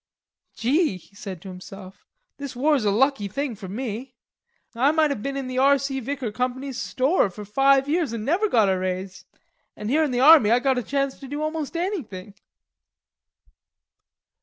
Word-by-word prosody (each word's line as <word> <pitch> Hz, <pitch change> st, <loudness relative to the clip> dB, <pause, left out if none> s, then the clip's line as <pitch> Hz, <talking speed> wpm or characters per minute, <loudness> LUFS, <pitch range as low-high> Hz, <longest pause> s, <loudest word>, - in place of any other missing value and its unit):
"Gee," 275 Hz, -, +1 dB
he 200 Hz, -, -21 dB
said 190 Hz, -4 st, -8 dB
to 195 Hz, -, -8 dB
himself, 185 Hz, +1 st, -11 dB, 0.3 s
"this 280 Hz, -2 st, -7 dB
war's 275 Hz, -2 st, +2 dB
a -, -, +3 dB
lucky 230 Hz, 0 st, +2 dB
thing 270 Hz, +4 st, -3 dB
for 195 Hz, -1 st, -9 dB
me. 240 Hz, +4 st, -5 dB, 0.6 s
I 250 Hz, +4 st, +3 dB
might 315 Hz, -2 st, +2 dB
have 230 Hz, -, -3 dB
been 275 Hz, +3 st, -3 dB
in 270 Hz, -, -3 dB
the 255 Hz, 0 st, -2 dB
R.C. 275 Hz, 0 st, +2 dB
Vicker 265 Hz, -2 st, -4 dB
Company's 255 Hz, +3 st, -3 dB
store 270 Hz, -, +1 dB
for 205 Hz, +3 st, -9 dB
five 270 Hz, +5 st, +3 dB
years 315 Hz, -3 st, 0 dB
an' 225 Hz, -2 st, -4 dB
never 370 Hz, -, +1 dB
got 220 Hz, -, +4 dB
a 190 Hz, -1 st, +1 dB
raise, 185 Hz, 0 st, -4 dB, 0.5 s
an' 210 Hz, +1 st, -5 dB
here 310 Hz, +5 st, +3 dB
in 300 Hz, -, 0 dB
the 245 Hz, -1 st, -1 dB
army 290 Hz, -5 st, +7 dB
I 235 Hz, -, +5 dB
got 260 Hz, 0 st, +1 dB
a -, -, -2 dB
chance 275 Hz, +2 st, -2 dB
to 275 Hz, -, -9 dB
do 290 Hz, +3 st, -4 dB
almost 310 Hz, 0 st, -3 dB
anything." 230 Hz, -, -4 dB
255 Hz, 180 wpm, -24 LUFS, 210-280 Hz, 0.6 s, army